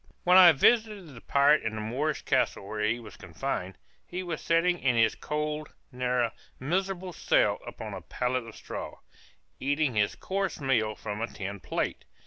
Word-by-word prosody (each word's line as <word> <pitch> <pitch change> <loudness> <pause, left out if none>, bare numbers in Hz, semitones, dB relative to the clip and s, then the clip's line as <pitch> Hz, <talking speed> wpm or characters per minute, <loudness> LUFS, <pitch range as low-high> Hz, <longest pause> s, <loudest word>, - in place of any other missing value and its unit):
When 180 +1 +5
I 185 -2 +10
visited 210 - +2
the 115 - -12
pirate 145 +2 +4
in 110 -1 -3
the 110 - -4
Moorish 135 +8 -2
castle 100 - 0
where 105 0 -3
he 110 +3 +1
was 115 - -12
confined, 95 0 -4 0.3
he 180 +1 -5
was 170 -3 -4
sitting 170 +1 +2
in 125 -3 +2
his 115 -1 +4
cold, 150 0 -4 0.2
narrow, 125 -2 0 0.3
and 130 - -6
miserable 190 -1 -1
cell, - - +2
upon - - -7
a - - -6
pallet 125 -1 -2
of 115 - -11
straw, - - -7 0.6
eating 145 0 +1
his 105 -1 +1
coarse 195 0 -2
meal 115 -6 +1
from 105 0 -5
a 115 - -1
tin 100 -2 -6
plate. - - -3
135 Hz, 175 wpm, -28 LUFS, 110-170 Hz, 0.6 s, I